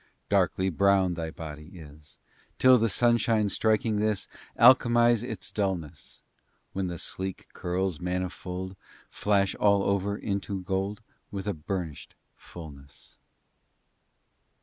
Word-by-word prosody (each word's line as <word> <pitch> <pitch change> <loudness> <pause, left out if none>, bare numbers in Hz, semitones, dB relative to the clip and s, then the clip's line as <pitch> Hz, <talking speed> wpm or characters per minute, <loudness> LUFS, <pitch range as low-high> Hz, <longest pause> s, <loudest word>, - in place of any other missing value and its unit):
III - - -34 0.2
Darkly 95 +1 +2
brown 95 +1 +3
thy 80 -1 -4
body 75 +1 -9
is, 75 -2 -13 0.4
Till 130 -1 +6
the 115 +1 +2
sunshine 115 0 +2
striking 110 +2 +1
this 105 -2 0 0.3
Alchemize 120 -2 +6
its 115 -5 -6
dulness, 85 -9 -4 0.5
When 95 -1 -2
the 85 -1 -5
sleek 95 +3 -5
curls 90 -1 -2
manifold 90 +1 -4 0.4
Flash 100 -2 +1
all 100 -1 +3
over 100 +1 0
into 100 -2 -3
gold 95 +4 -2 0.3
With 100 -1 -5
a 105 - -1
burnished 80 -1 -5 0.2
fulness. 70 -5 -13
95 Hz, 115 wpm, -27 LUFS, 90-105 Hz, 0.5 s, Till